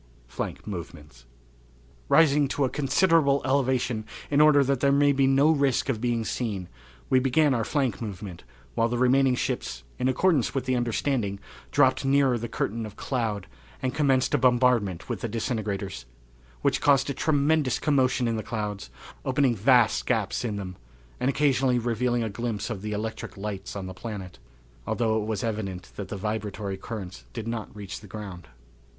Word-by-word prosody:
Flank - - -5
Movements. 75 - -8 0.8
Rising 150 -3 +5
to 140 0 0
a 130 - -2
considerable 145 0 +3
elevation 130 -4 +1 0.3
in 145 +1 +4
order 150 -2 +6
that 135 -1 0
there 140 +1 +3
might 140 0 +4
be 135 0 +3
no 135 +3 +5
risk 140 -4 +1
of 115 -5 -1
being 120 -2 0
seen, 100 -9 -3 0.4
we 130 - +6
began 135 +3 +3
our 115 -2 0
flank 130 0 -1
movement 100 -4 -7 0.3
while 115 - +1
the 120 - -1
remaining 130 +1 +4
ships, 60 - -3 0.2
in 125 - +1
accordance 140 -1 +2
with 130 -2 -1
the 130 0 +1
understanding, 120 -3 -1 0.3
dropped 130 -2 +3
nearer 135 -2 +3
the 120 - -4
curtain 115 +1 -2
of 105 - -12
cloud 110 -8 -2 0.3
and 130 -2 -2
commenced 135 -3 +2
a 145 - +3
bombardment 120 -7 +2
with - - -4
the - - -2
disintegrators, 100 - -3 0.6
which - - +2
caused 140 -2 +4
a - - -2
tremendous 145 -2 +2
commotion 130 -4 +2
in 115 -1 0
the - - -2
clouds, 105 -2 -4 0.3
opening 135 -2 +2
vast 110 - +3
gaps - - 0
in 110 -4 -2
them, 95 -2 -6 0.4
and 125 - +1
occasionally 135 -3 +2
revealing 120 0 0
a - - -1
glimpse 115 +1 -3
of 100 -5 -5
the 105 +1 -4
electric 110 0 -4
lights 100 -1 -5
on 100 -2 -4
the 95 - -6
planet, 100 -5 -7 0.5
although 110 -2 +1
it 105 - -5
was 110 -3 -2
evident 105 -5 -4
that 100 - -5
the 100 - -5
vibratory 105 -1 -3
currents 95 -2 -7
did 115 -3 -5
not 115 -2 -5
reach 100 -2 -7
the 105 - -13
ground. 95 -4 -8
120 Hz, 170 wpm, -26 LUFS, 105-135 Hz, 0.8 s, order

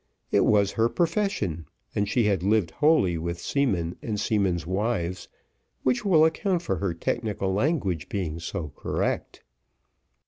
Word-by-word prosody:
It - - +4
was 100 -2 +3
her 115 +1 +2
profession, 165 - -1 0.3
and 105 0 0
she 120 - +2
had 100 -4 +2
lived 100 -3 +2
wholly 120 - +3
with 85 +1 -3
seamen 95 -13 0
and 105 -3 -3
seamen's 95 -6 0
wives, 95 -1 -2 0.6
which 125 +5 +1
will 165 -6 +5
account 175 +2 0
for - - -1
her 95 -4 -2
technical 100 +1 -2
language 100 - 0
being 85 -5 -3
so 85 -1 -4
correct. - - -2
100 Hz, 140 wpm, -26 LUFS, 85-130 Hz, 0.6 s, will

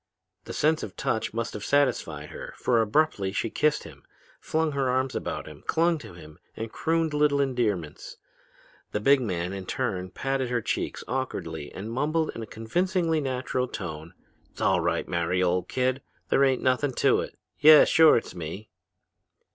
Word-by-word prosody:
The - - -7
sense 155 +1 +2
of 95 - -7
touch 110 - -1
must 115 +1 -3
have 105 - -6
satisfied 115 - 0
her, - - -8
for 120 -2 +2
abruptly 110 -4 +1
she 105 +2 -2
kissed 150 0 +1
him, - - -13 0.4
flung 160 0 0
her 135 -2 0
arms 130 +1 0
about - - -4
him, 75 -1 -12
clung 165 0 +2
to 120 - -11
him, 75 -1 -13 0.2
and 110 0 -5
crooned 165 -1 0
little 150 -1 +3
endearments. 110 - -2 0.8
The 105 - 0
big 135 +5 +4
man, 90 -5 -2
in 95 -2 -6
turn, 95 -8 -2
patted 135 +5 -2
her 120 -1 +1
cheeks 110 - -3
awkwardly 80 - -4
and 105 +4 -7
mumbled 155 +5 0
in 115 - -7
a 110 - -6
convincingly 165 - 0
natural 130 -1 -2
voice, 80 -7 -6 0.5
''Sall - - +1
right, - - 0
Mary, 85 +2 0
old 90 0 0
kid! 130 +1 0 0.3
There 140 - +4
ain't 130 -2 +2
nothin' 130 +1 +1
to - - +3
it. - - -6 0.2
Yeah! 155 0 +9
Sure 160 -1 +6
it's 115 - -4
me!' 90 +5 -7
125 Hz, 170 wpm, -26 LUFS, 95-145 Hz, 0.8 s, Yeah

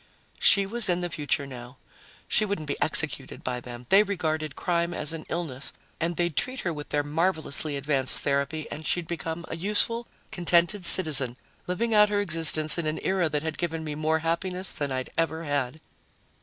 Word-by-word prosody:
She 200 -1 +6
was 220 0 -3
in 175 0 +1
the 175 -1 -3
future 145 -2 -1
now. 125 -1 -10 0.5
She - - +3
wouldn't 200 -7 -3
be 145 - -4
executed 150 -4 +3
by 125 -1 -3
them; 120 0 -10
they 195 +2 +7
regarded 155 -7 -2
crime 170 0 -1
as 150 +1 -3
an 160 -1 -8
illness, 155 -6 -3 0.3
and 170 +1 -2
they'd 175 -3 -1
treat 255 0 -2
her 175 - -2
with 150 -1 -8
their 145 0 0
marvelously 155 -2 -1
advanced 140 -2 -1
therapy 140 +2 -1
and 155 - -6
she'd 175 +2 0
become 165 0 -5
a - - -5
useful, 210 +6 +1 0.2
contented 175 +2 +2
citizen, 140 -10 +5 0.3
living 225 +6 -1
out 210 -1 +6
her 205 -1 0
existence 160 -4 +4
in 165 - -2
an 155 - -2
era 185 -4 +1
that 150 0 -2
had 160 -1 -4
given 165 -2 -3
me 155 -1 -4
more 155 +1 0
happiness 180 +3 -2
than 145 -2 -3
I'd 130 -1 -4
ever 165 0 -1
had. 145 -1 -2
160 Hz, 185 wpm, -26 LUFS, 145-180 Hz, 0.5 s, they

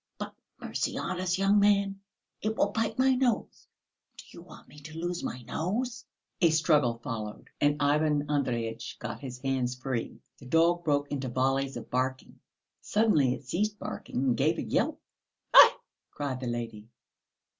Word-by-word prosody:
"But - - -6 0.3
mercy - - -2
on 185 -1 -3
us, 185 0 0
young 195 +1 +4
man, 200 -1 +2 0.4
it 220 +1 -2
will - - +3
bite 225 +1 -1
my 265 +1 +4
nose. 250 -3 -1 0.5
Do - - -11
you 170 - -12
want 170 -2 -14
me 150 - -14
to 155 +2 -10
lose 175 +1 -3
my 125 - -5
nose?" 240 - -3 0.4
A 170 - +6
struggle 150 -6 +3
followed, 110 -3 -6
and 145 +1 +3
Ivan 150 0 +2
Andreyitch 120 -6 -2
got - - -6
his 130 -3 -7
hands 130 -2 -1
free. 125 -2 -4 0.2
The 130 - -12
dog 170 +4 +3
broke 145 -2 0
into 135 -3 -2
volleys 135 +2 0
of - - -9
barking. 130 +1 -2 0.4
Suddenly 165 - +2
it 135 - -13
ceased 210 +8 -1
barking - - -6
and 130 -3 +2
gave - - +2
a - - -2
yelp. - - 0 0.5
"Aïe!" - - +10 0.4
cried 135 -3 -4
the 130 - -4
lady. 115 -3 -5
145 Hz, 165 wpm, -29 LUFS, 130-185 Hz, 0.5 s, Aïe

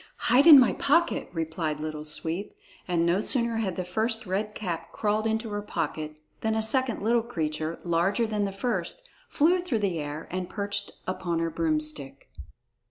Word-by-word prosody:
"Hide 275 +6 +6
in 300 -4 +12
my 250 - +4
pocket," 335 +4 +1
replied 160 -2 -3
Little 155 0 -5
Sweep, 165 +5 -2 0.3
and 170 -2 +1
no 175 +4 +2
sooner 235 -1 +1
had 195 -5 -1
the 185 - -2
first 220 +5 -1
Red 205 +3 -2
Cap 175 -5 -4
crawled 215 +1 0
into 220 0 -2
her 205 0 -2
pocket 155 -6 -4 0.2
than 220 0 0
a 220 - 0
second 245 -1 0
little 235 +2 +3
creature, 160 -7 -3
larger 175 +6 +1
than 210 -2 -1
the 195 - -2
first, 245 - -3 0.2
flew 345 +5 +3
through 350 -10 -1
the 175 -4 -1
air 150 +1 -5
and 180 0 -3
perched 200 -1 -3 0.2
upon 180 -2 -2
her 165 0 -1
broomstick. 155 -4 -2
195 Hz, 170 wpm, -27 LUFS, 165-225 Hz, 0.3 s, in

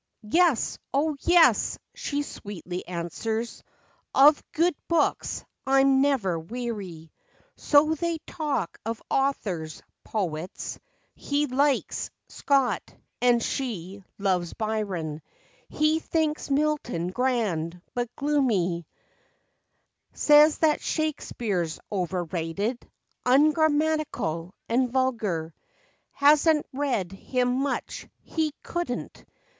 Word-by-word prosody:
"Yes, 335 -8 +3 0.2
O 300 +2 +2
yes," 345 +1 +4 0.2
she 290 0 -2
sweetly 185 - -7
answers; 200 +7 -3 0.3
" - - -22
Of 290 +2 +7
good 340 +3 +2
books 335 - 0 0.2
I'm 270 0 +5
never 230 -12 +1
weary." 195 -5 -6 0.4
So 305 +1 +4
they 335 +1 -1
talk 290 - -3
of 225 +1 -3
authors, 195 - -1 0.2
poets; 180 -4 -4 0.3
He 290 +1 -1
"likes" 275 +1 0 0.2
Scott, 275 -3 0 0.3
and 240 -2 +4
she 200 -7 -4
"loves" 185 -4 0
Byron; 195 -8 -2 0.5
He 305 +1 +2
thinks 315 -2 -1
Milton 275 - 0
grand, 185 -8 -1
but 245 -1 -2
gloomy, 210 - +1 1.3
Says 300 +1 +6
that 310 -2 +2
Shakespeare's 220 - -2
overrated, 180 +3 -2 0.3
Ungrammatical 295 - +2
and 250 +2 +2
vulgar; 215 -11 0 0.6
Has 290 +3 +5
n't 305 -2 +3
read 255 -10 -1
him 250 +5 -1
much, 280 +1 -3 0.2
he 315 -2 -1
could 345 -3 -3
n't. 245 - -6
245 Hz, 95 wpm, -26 LUFS, 185-295 Hz, 1.3 s, Of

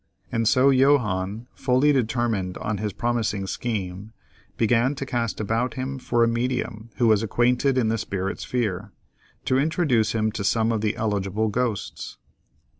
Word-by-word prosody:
And 115 -1 0
so 135 +3 +5
Johannes, 115 -6 +2
fully 130 +3 +2
determined 115 -7 0
on 105 0 -3
this 105 +1 -2
promising 110 -2 -1
scheme, 100 -1 -4 0.4
began 120 +4 +2
to 135 - -4
cast 120 -3 -2
about 115 +3 -1
him 130 +1 -4
for 120 -2 +1
a - - +4
medium 115 -1 -2
who 120 - +1
was 110 -2 +4
acquainted 125 +4 +1
in 115 -4 +2
the 115 0 0
spirit 95 -1 -3
sphere, 110 -8 -2 0.5
to 130 - +2
introduce 145 -7 +1
him 110 -1 0
to 110 -2 -4
some 110 +3 +2
of 110 -2 -1
the 105 0 0
eligible 105 0 -1
ghosts. 115 -1 -3
115 Hz, 155 wpm, -24 LUFS, 105-125 Hz, 0.5 s, so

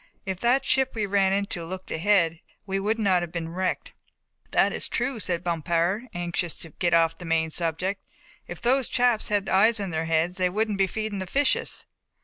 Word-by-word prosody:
If 190 -2 -3
that 255 +4 +2
ship 265 -2 +2
we 215 -2 0
ran 195 -1 +2
into 200 -1 -1
had 165 0 -7
looked 185 0 -7
ahead 170 -2 +2 0.3
we 195 -1 -1
would 215 +3 0
not 190 -5 +2
have 175 -2 -5
been 165 -1 -4
wrecked." 185 +2 -2 0.6
"That - - +3
is - - -2
true," 245 0 -1
said 175 -4 -1
Bompard, 170 +6 0
anxious 175 -1 -2
to 165 - -7
get 175 +1 +1
off 165 -1 +2
the - - -8
main 160 -1 +1
subject. 175 +5 -2 0.5
"If - - -8
those 255 +1 +3
chaps 245 -3 +2
had 205 -2 0
eyes 220 +4 +4
in 195 -3 -3
their 160 0 -1
heads 165 +3 0
they 180 -1 +3
wouldn't 210 +1 -1
be 195 - +4
feeding 215 -1 -3
the 185 - -4
fishes." 275 +8 0
190 Hz, 200 wpm, -26 LUFS, 170-215 Hz, 0.6 s, eyes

